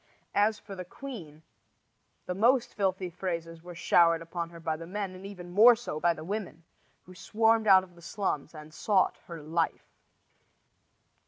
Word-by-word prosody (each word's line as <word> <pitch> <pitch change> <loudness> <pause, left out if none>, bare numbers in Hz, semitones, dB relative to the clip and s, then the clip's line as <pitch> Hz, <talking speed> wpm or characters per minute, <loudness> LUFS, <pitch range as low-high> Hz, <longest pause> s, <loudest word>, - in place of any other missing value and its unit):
As 210 +1 +2
for 205 - -11
the 185 - -6
queen, 180 - -10 0.8
the 180 - -3
most 235 +5 +2
filthy 190 -2 -1
phrases 165 -2 -5
were 175 0 -10
showered 165 -1 +3
upon 170 0 -5
her 170 0 -12
by 160 -1 -2
the 165 +1 -9
men, 195 0 -4
and 185 +1 -9
even 180 -3 -10
more 225 +6 +8
so 225 -10 -6
by 170 +1 +2
the 155 - -9
women, 185 -3 -5 0.4
who 185 - -14
swarmed 220 +3 +1
out 190 -1 +7
of 180 -1 -15
the 170 - -17
slums 165 -4 -3
and 155 0 -11
sought 195 +2 +1
her 165 -3 -8
life. 160 +2 -1
180 Hz, 170 wpm, -29 LUFS, 165-205 Hz, 0.8 s, more